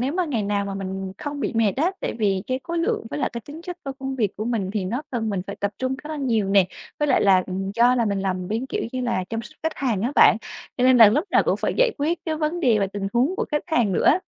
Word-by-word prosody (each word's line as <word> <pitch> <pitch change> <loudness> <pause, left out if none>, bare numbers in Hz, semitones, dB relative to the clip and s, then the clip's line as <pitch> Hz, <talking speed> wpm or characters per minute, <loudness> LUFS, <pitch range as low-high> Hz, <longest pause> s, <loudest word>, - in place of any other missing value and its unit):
nếu 265 +4 0
mà 365 0 0
ngày 245 -9 -1
nào 200 0 0
mà 195 -1 -4
mình 190 0 -5
không 290 -1 -5
bị - - -1
mệt 220 -4 +3
á, 325 +7 +2
tại - - -3
vì 195 -3 +1
cái 255 +1 -2
khối 340 0 -3
lượng 330 -8 -1
với - - -3
lại - - 0
cái 235 - -5
tính 295 +8 -10
chất 355 -1 -6
tôi 275 -4 -5
công 265 0 -4
việc 210 -5 -1
của 215 - -3
mình 220 -5 -1
thì 205 -3 -2
nó 240 +10 -2
cần 225 -4 -2
mình 190 -3 -2
phải 200 - -6
tập 200 0 -1
trung 260 0 -1
khá 300 +1 -10
là 310 - -4
nhiều 230 -8 0
nè, 195 -2 +5 0.3
với 295 -1 +1
lại - - +4
là, 190 -2 +5
ừm, 190 +1 -3
do 240 +2 +5
là 240 -2 +2
mình 200 -2 -1
làm 185 -2 -2
bên, 230 +5 -2
kiểu - - -3
như 255 - -2
là, 235 -7 -1
chăm 225 0 -3
sóc 305 +6 -14
khách 320 - -2
hàng 230 -8 -1
á 250 +5 -1
bạn, - - +7 0.4
cho 250 - +1
nên 255 -1 +6
là 225 -3 +9
lúc 295 - +1
nào - - +4
cũng - - +1
phải - - -1
giải - - +4
quyết 320 +4 0
cái 315 -2 -1
vấn 315 +3 -1
đề 235 -7 +3
về 195 - +1
tình 195 0 -4
huống 265 +11 +2
của - - 0
khách 295 -1 0
hàng 240 - +1
nữa. 350 - +4
235 Hz, 305 wpm, -23 LUFS, 200-290 Hz, 0.4 s, là